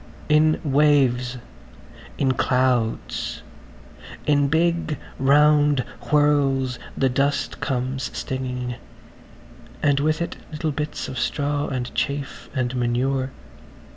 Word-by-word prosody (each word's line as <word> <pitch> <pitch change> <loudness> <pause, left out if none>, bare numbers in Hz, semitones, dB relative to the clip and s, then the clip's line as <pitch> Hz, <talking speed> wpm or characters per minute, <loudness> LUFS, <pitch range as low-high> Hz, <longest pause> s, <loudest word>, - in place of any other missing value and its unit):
In 155 +1 +4
waves, 135 -4 +3 0.8
in 135 -2 +2
clouds, 125 -3 0 0.8
in 145 -1 +3
big 165 0 +1 0.2
round 145 0 +4 0.3
whirls 140 -4 +2 0.2
the 135 - +3
dust 140 +2 0
comes 130 0 -2
stinging, 125 -2 -4 1.1
and 145 -2 +3
with 155 +2 +1
it 170 - -3
little 155 0 -2
bits 150 +1 -4
of 130 -2 -5
straw 145 +2 -1
and 125 -2 -4
chaff 140 0 -3
and 130 -1 -1
manure. 130 +2 0
140 Hz, 100 wpm, -23 LUFS, 130-150 Hz, 1.1 s, In